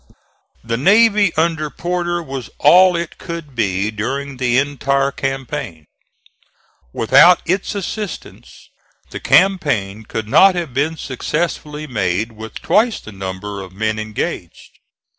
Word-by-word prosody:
The 115 Hz, 0 st, -2 dB
navy 205 Hz, -, +4 dB
under 160 Hz, -2 st, 0 dB
Porter 175 Hz, +1 st, -2 dB
was 135 Hz, -5 st, -7 dB
all 180 Hz, +5 st, +6 dB
it 170 Hz, -1 st, -4 dB
could 170 Hz, -5 st, -7 dB
be, 100 Hz, -2 st, 0 dB
during 135 Hz, +6 st, -4 dB
the 125 Hz, -1 st, +1 dB
entire 140 Hz, 0 st, 0 dB
campaign. 135 Hz, -, -5 dB, 1.1 s
Without 165 Hz, -, +5 dB
its 190 Hz, +4 st, -1 dB
assistance 200 Hz, 0 st, -7 dB, 0.4 s
the -, -, -6 dB
campaign 125 Hz, -, +2 dB
could 110 Hz, -1 st, -5 dB
not 190 Hz, -, +5 dB
have 170 Hz, -7 st, -4 dB
been 150 Hz, +5 st, -1 dB
successfully 150 Hz, +2 st, -3 dB
made 105 Hz, -4 st, -1 dB
with 110 Hz, 0 st, -10 dB
twice 225 Hz, +1 st, +2 dB
the 110 Hz, -, -11 dB
number 95 Hz, +1 st, -6 dB
of 95 Hz, -1 st, -11 dB
men 110 Hz, +2 st, -2 dB
engaged. 110 Hz, -1 st, -6 dB
140 Hz, 120 wpm, -18 LUFS, 110-170 Hz, 1.1 s, all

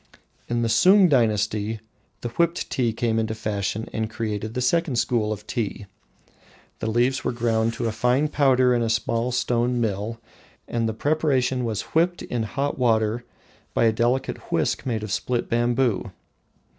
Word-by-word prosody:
In 120 Hz, 0 st, 0 dB
the -, -, +1 dB
Sung 185 Hz, -, +6 dB
dynasty 110 Hz, -4 st, +1 dB, 0.4 s
the 120 Hz, -, -3 dB
whipped 170 Hz, +7 st, 0 dB
tea 120 Hz, -3 st, +1 dB
came 115 Hz, 0 st, 0 dB
into 110 Hz, 0 st, -2 dB
fashion 105 Hz, 0 st, -3 dB
and 110 Hz, 0 st, -2 dB
created 110 Hz, -1 st, -4 dB
the -, -, -1 dB
second 160 Hz, +2 st, +1 dB
school 115 Hz, -2 st, +1 dB
of 105 Hz, -1 st, -5 dB
Tea. 105 Hz, -3 st, -3 dB, 0.9 s
The 110 Hz, -, -2 dB
leaves 120 Hz, +4 st, +1 dB
were -, -, 0 dB
ground 115 Hz, -1 st, 0 dB
to 115 Hz, -1 st, -1 dB
fine 125 Hz, +6 st, +2 dB
powder 130 Hz, -4 st, +3 dB
in 120 Hz, -, +1 dB
a 115 Hz, -, 0 dB
small 115 Hz, +2 st, 0 dB
stone 125 Hz, 0 st, 0 dB
mill, 110 Hz, +1 st, -2 dB, 0.5 s
and 115 Hz, -1 st, -1 dB
the 110 Hz, -, -4 dB
preparation 135 Hz, -3 st, +1 dB
was 110 Hz, -3 st, -2 dB
whipped 175 Hz, +2 st, +2 dB
in 120 Hz, -, -3 dB
hot 140 Hz, +6 st, -2 dB
water 115 Hz, -1 st, +1 dB, 0.5 s
by -, -, +3 dB
a 115 Hz, -1 st, +4 dB
delicate 120 Hz, +4 st, -1 dB
whisk -, -, 0 dB
made 110 Hz, -3 st, -1 dB
of 105 Hz, -, -5 dB
split 120 Hz, +4 st, -1 dB
bamboo. 120 Hz, -1 st, +1 dB
120 Hz, 160 wpm, -24 LUFS, 110-125 Hz, 0.9 s, Sung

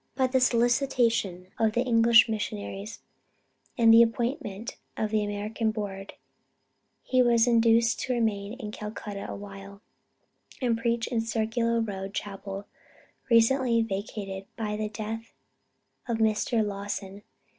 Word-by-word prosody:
By 260 Hz, 0 st, +2 dB
the 260 Hz, 0 st, +2 dB
solicitation 235 Hz, -7 st, +1 dB
of 220 Hz, -1 st, +2 dB
the 240 Hz, -, +1 dB
English 230 Hz, -2 st, +6 dB
missionaries, 210 Hz, -1 st, -5 dB, 0.8 s
and 225 Hz, -2 st, +6 dB
the 230 Hz, -, +9 dB
appointment 230 Hz, -2 st, -1 dB, 0.2 s
of 215 Hz, -1 st, -1 dB
the 215 Hz, -1 st, +2 dB
American 210 Hz, +2 st, -2 dB
Board, 200 Hz, -3 st, -5 dB, 0.9 s
he 255 Hz, -1 st, +2 dB
was 235 Hz, -2 st, +4 dB
induced 230 Hz, -1 st, +3 dB
to 255 Hz, -, -1 dB
remain 215 Hz, -3 st, -1 dB
in 230 Hz, -5 st, -7 dB
Calcutta 210 Hz, -1 st, -6 dB
a -, -, -5 dB
while, 200 Hz, 0 st, -10 dB, 0.8 s
and 245 Hz, -3 st, +1 dB
preach 230 Hz, 0 st, 0 dB
in 235 Hz, -3 st, -1 dB
Circular 230 Hz, +1 st, 0 dB
Road 195 Hz, -3 st, -4 dB
Chapel, 195 Hz, 0 st, -5 dB, 0.6 s
recently 230 Hz, 0 st, +4 dB
vacated 195 Hz, -2 st, -5 dB
by 210 Hz, -2 st, -3 dB
the 215 Hz, 0 st, -3 dB
death 220 Hz, +1 st, -6 dB, 0.7 s
of 235 Hz, -2 st, -1 dB
Mr. 220 Hz, 0 st, +1 dB
Lawson. 200 Hz, -1 st, -5 dB
225 Hz, 125 wpm, -27 LUFS, 205-235 Hz, 0.9 s, the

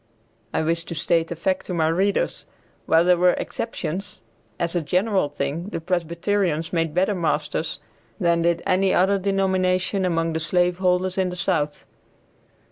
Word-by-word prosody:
I -, -, 0 dB
wish 165 Hz, +1 st, 0 dB
to 170 Hz, -, -6 dB
state 165 Hz, 0 st, +1 dB
a -, -, -2 dB
fact 185 Hz, +3 st, -1 dB
to 180 Hz, -, -3 dB
my 160 Hz, -2 st, +2 dB
readers. 190 Hz, +5 st, 0 dB, 0.4 s
While 165 Hz, +1 st, +4 dB
there 180 Hz, 0 st, +5 dB
were 180 Hz, 0 st, +5 dB
exceptions, 195 Hz, -, -4 dB, 0.4 s
as 170 Hz, +1 st, -1 dB
a 175 Hz, -, +2 dB
general 185 Hz, +1 st, +1 dB
thing 145 Hz, +5 st, -3 dB
the 165 Hz, -, -4 dB
Presbyterians 170 Hz, 0 st, -1 dB
made 165 Hz, -2 st, 0 dB
better 190 Hz, +3 st, +2 dB
masters 160 Hz, -2 st, -1 dB, 0.4 s
than 170 Hz, -1 st, +2 dB
did 170 Hz, 0 st, +1 dB
any 190 Hz, +1 st, +2 dB
other 195 Hz, +2 st, +3 dB
denomination 190 Hz, 0 st, +1 dB
among 165 Hz, -2 st, 0 dB
the 160 Hz, -, -1 dB
slave 175 Hz, +2 st, +1 dB
holders 185 Hz, 0 st, +1 dB
in 185 Hz, -1 st, +1 dB
the 180 Hz, -, -5 dB
South. 150 Hz, -4 st, -1 dB
175 Hz, 160 wpm, -23 LUFS, 165-185 Hz, 0.4 s, there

